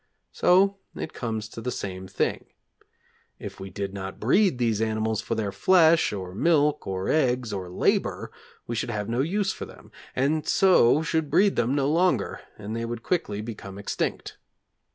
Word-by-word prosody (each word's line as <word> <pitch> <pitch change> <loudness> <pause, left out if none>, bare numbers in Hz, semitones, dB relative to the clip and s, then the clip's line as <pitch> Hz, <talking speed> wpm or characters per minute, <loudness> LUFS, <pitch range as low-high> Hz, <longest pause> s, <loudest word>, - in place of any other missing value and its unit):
So 195 +2 +3 0.2
it - - -6
comes 110 -3 -4
to 115 - -8
the 125 - -3
same 95 -5 -5
thing. 95 - -1 0.9
If - - -9
we 95 - -7
did 100 +1 -5
not 95 -1 -6
breed 180 - +3
these 115 -3 0
animals 110 -1 0
for 115 - -3
their 105 -3 -2
flesh, 165 - +4
or 95 -3 -6
milk, 150 - +2
or 95 0 -3
eggs, 125 -6 +1
or 95 -2 -4
labour, 90 - 0 0.3
we 120 - -4
should 115 - -2
have 105 -3 -3
no 115 +2 -1
use 195 +6 0
for - - -7
them, - - -15 0.2
and 150 +4 0
so 160 -6 +4
should 160 -2 -1
breed 200 +5 +3
them 120 +4 +1
no 140 -1 +1
longer, 160 - +1 0.2
and 105 +2 -6
they 115 - -3
would 115 0 -5
quickly 105 - -1
become 100 -3 -8
extinct. 100 - -3
115 Hz, 175 wpm, -26 LUFS, 100-155 Hz, 0.9 s, flesh